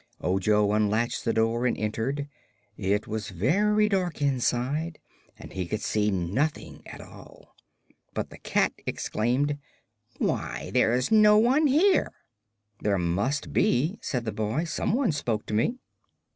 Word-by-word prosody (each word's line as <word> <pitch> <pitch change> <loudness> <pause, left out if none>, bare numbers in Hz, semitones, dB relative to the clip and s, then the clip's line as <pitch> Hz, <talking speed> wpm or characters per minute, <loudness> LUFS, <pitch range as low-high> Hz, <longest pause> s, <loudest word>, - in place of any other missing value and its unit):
Ojo 100 +3 +2
unlatched 110 +2 0
the 115 - +2
door 115 +2 +1
and - - -1
entered. 115 +7 -2 0.5
It 100 +1 0
was 110 +1 -4
very 205 - +2
dark 185 -6 -1
inside 140 +3 0 0.4
and - - -11
he 90 -2 -3
could 110 +4 -3
see 105 -1 +1
nothing 100 - -2
at - - -10
all. - - -15 0.6
But - - -3
the - - -12
cat - - +1
exclaimed: 135 +6 -1 0.6
"Why, 60 +5 -2
there's 125 - +2
no 210 -1 +6
one 260 +8 +4
here!" 345 +8 +3 0.7
"There 100 -1 +1
must 95 - -1
be," 155 - +1
said 125 -3 -3
the 110 - -2
boy. 110 +9 -1
"Some 170 +4 -2
one 255 -6 +2
spoke 120 -8 -2
to - - -6
me." 170 - +1
120 Hz, 140 wpm, -27 LUFS, 105-160 Hz, 0.7 s, no